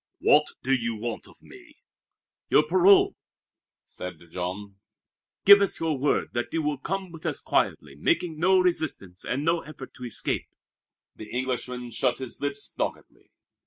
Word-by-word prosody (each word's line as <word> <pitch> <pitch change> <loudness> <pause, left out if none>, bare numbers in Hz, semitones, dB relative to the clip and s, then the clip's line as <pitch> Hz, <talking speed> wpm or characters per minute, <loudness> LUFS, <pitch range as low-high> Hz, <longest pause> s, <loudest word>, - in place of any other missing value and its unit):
"What - - +4 0.2
do 135 - +1
you 120 -3 0
want 115 +1 -5
of - - -20
me?" - - -16 0.7
"Your 150 - +5
parole!" 185 +5 +5 0.7
said 90 0 -7
Jean. 95 +3 -5 0.7
"Give 200 0 +10
us 200 - +1
your 160 -2 0
word 140 +2 0
that 120 0 -2
you 165 -1 -1
will 150 -2 -1
come 190 +3 -4
with 165 -2 -11
us - - -1
quietly, 70 -2 0
making 155 - 0
no 190 +3 +4
resistance 155 - -1
and 140 +4 -2
no 165 +1 +2
effort 140 -3 -11
to 125 - -9
escape." 120 - -2 0.7
The 110 - -10
Englishman 125 -1 -3
shut 120 +2 +1
his 130 -2 -8
lips 145 0 -3
doggedly. - - -5
135 Hz, 155 wpm, -26 LUFS, 120-165 Hz, 0.7 s, Give